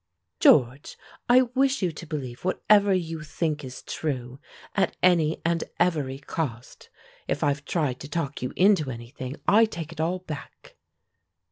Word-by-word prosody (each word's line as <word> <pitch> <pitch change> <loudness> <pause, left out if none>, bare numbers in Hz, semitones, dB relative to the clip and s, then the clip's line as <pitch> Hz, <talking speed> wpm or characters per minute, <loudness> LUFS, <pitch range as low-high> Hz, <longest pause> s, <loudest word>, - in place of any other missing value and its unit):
"George, 130 0 +4 0.3
I 255 +1 +7
wish 265 0 +1
you 180 - +1
to 160 +1 -10
believe 130 -5 -5
whatever 200 +2 +3
you 165 -4 -1
think 155 -1 -2
is 130 -1 -8
true, 130 -4 -4 0.3
at 195 - 0
any 165 -3 +3
and 170 0 +1 0.2
every 150 -7 +1
cost. 135 -4 -5 0.4
If - - -1
I've 145 0 0
tried 145 -7 -1
to 145 - -9
talk 155 -4 -3
you 125 - -3
into 185 -7 +4
anything, 125 +2 -7
I 225 +2 +6
take 170 -7 -7
it 160 -1 -5
all 170 +3 0
back." 160 -6 -10
155 Hz, 150 wpm, -26 LUFS, 135-180 Hz, 0.4 s, I